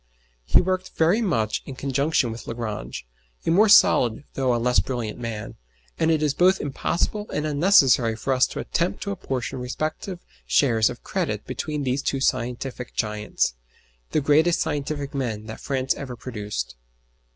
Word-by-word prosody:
He - - +5
worked 185 0 -2
very 170 +8 +3
much 110 - 0
in 135 - -6
conjunction 140 -1 +1
with 115 - -8
Lagrange, 110 - -5 0.4
a - - +2
more 205 +5 +5
solid 125 - +5
though 130 -2 +1
a - - +1
less 125 +1 +2
brilliant 120 -4 -3
man, 115 -3 -5 0.4
and 160 - +3
it 155 -2 +2
is 150 -2 +2
both 185 +4 +4
impossible 175 +8 -2
and 150 - -2
unnecessary 140 - +4
for 135 +4 -1
us 130 0 +4
to - - -6
attempt 170 +2 -1
to 200 - -3
apportion 130 -9 -4
respective 155 +8 -4 0.3
shares 115 -6 +3
of - - -9
credit - - -2
between 150 -2 -3
these 130 +1 0
two 135 - -1
scientific 125 -1 -2
giants, 105 - -1 0.6
the 155 - +1
greatest 155 +4 +3
scientific 145 -2 -2
men 115 -6 -3
that 110 0 -8
France 130 -1 0
ever 130 -3 -7
produced. 105 - -5
135 Hz, 160 wpm, -24 LUFS, 120-155 Hz, 0.6 s, He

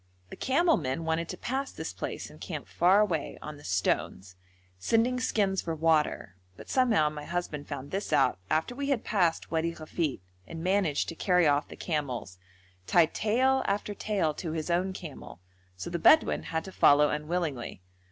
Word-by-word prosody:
The - - -6
camel 330 +5 +2
men 135 +6 -3
wanted 160 +1 -1
to - - -5
pass 270 +2 -3
this - - -6
place - - -5
and - - -16
camp - - -6
far 185 +4 +4
away 170 -8 -1
on 150 -1 -8
the 145 - -15
stones, 95 +1 -1 0.4
sending 230 - +2
skins 200 -5 +1
for 165 -1 -3
water, 155 - +1 0.2
but - - -10
somehow 235 -12 +3
my 150 -1 -7
husband 155 -3 -4
found 140 -1 -6
this 195 -1 -3
out 130 -8 +3
after 160 +10 0
we 280 +2 -3
had 265 -5 +1
passed 180 -6 0
Wadi 165 +1 0
Ghafit, 155 - -3 0.3
and 165 0 -7
managed 185 -5 +1
to 165 - -6
carry 180 0 +3
off 145 0 +2
the - - -10
camels, 130 - -3 0.5
tied 170 -2 +4
tail 260 +5 +2
after 205 +1 -1
tail 195 -7 -1
to 160 +1 -5
his 160 +1 -3
own 180 +2 +1
camel, 165 - -9 0.4
so 90 - -6
the 170 - -2
Bedouin 315 - +5
had 160 0 -2
to 190 - -9
follow 150 -4 +5
unwillingly. 150 - -3
165 Hz, 180 wpm, -29 LUFS, 150-200 Hz, 0.5 s, Bedouin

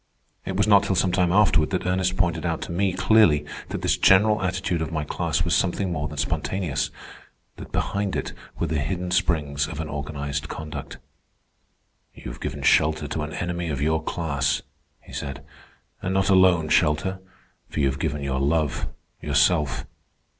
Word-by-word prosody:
It 95 - -3
was 105 +1 +2
not 100 -2 +7
till 95 - -1
some 90 0 +2
time 90 -1 +2
afterward 90 -5 +4
that 95 -2 -2
Ernest 90 0 0
pointed 85 -2 +1
out 85 -2 -2
to - - -7
me 95 +3 +1
clearly 90 -6 +4 0.2
that - - -5
this - - +2
general 105 +2 +5
attitude 95 -2 -1
of 80 - -3
my 80 -2 -1
class - - -1
was - - 0
something 95 0 0
more 75 -3 -2
than 75 0 -8
spontaneous, 80 -1 -1 0.7
that - - -10
behind 100 -2 -1
it - - -3 0.2
were - - 0
the 80 -2 -1
hidden 90 +5 -3
springs 75 -5 +1
of 80 - -7
an 80 - -3
organized 70 0 -4
conduct. 75 0 -7 1.2
"You - - -8
have - - -12
given - - -4
shelter 75 -1 +3
to 80 - -2
an 75 +1 -5
enemy 85 -1 -3
of 70 -3 -2
your 80 +2 +1
class," 75 -3 -1 0.4
he - - -15
said. 70 -1 -6 0.6
"And 95 +1 -2
not 95 +1 +2
alone 90 -4 +5
shelter, 95 +7 +2 0.5
for - - -5
you 70 - +3
have 70 0 -1
given 75 0 -2
your 65 -1 -1
love, 75 0 0 0.3
yourself. 75 +1 +2
80 Hz, 175 wpm, -24 LUFS, 75-95 Hz, 1.2 s, not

